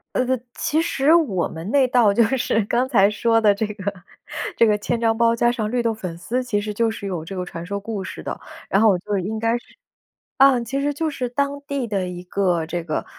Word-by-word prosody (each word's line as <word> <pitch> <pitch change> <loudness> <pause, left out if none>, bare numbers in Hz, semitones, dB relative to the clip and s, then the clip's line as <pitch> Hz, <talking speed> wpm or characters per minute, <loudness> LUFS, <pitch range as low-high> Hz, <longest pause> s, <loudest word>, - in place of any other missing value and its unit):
呃 - - +3
呃， 260 0 0 0.2
其 315 +2 0
实 315 -3 +2
我 255 - +2
们 165 +5 -7
那 275 -3 +4
道 235 -5 +4
就 230 +3 +4
是 225 -2 +1
刚 245 +5 +1
才 205 -6 +4
说 225 +1 +2
的 210 -2 +5
这 210 +2 -2
个 200 -1 -4 0.6
这 230 - +6
个 210 -2 +3
千 230 +3 -2
张 225 -1 +1
包， 230 0 +3
加 240 +1 +3
上 220 -3 -2
绿 245 -1 0
豆 230 -1 +1
粉 185 -6 -6
丝， 245 +8 -2
其 205 -4 -1
实 210 0 -4
就 230 +2 +1
是 220 -2 -6
有 175 -4 -4
这 195 +3 -7
个 180 -1 -3
传 165 0 -7
说 200 +2 -3
故 205 -1 -5
事 - - -8
的。 - - -5 0.3
然 195 - +3
后 225 - +6
我 190 - +3
就 205 +2 -2
应 205 +4 -3
该 230 +2 +1
是 - - -14 0.7
嗯， 265 -3 +5
其 270 +4 -2
实 290 +1 0
就 315 +2 -1
是 255 -4 -3
当 280 +3 -1
地 280 -3 -2
的 195 -4 -2
一 180 0 -7
个 180 -3 0
这 170 +1 -4
个 155 -2 -3
220 Hz, 265 characters per minute, -22 LUFS, 195-250 Hz, 0.7 s, 这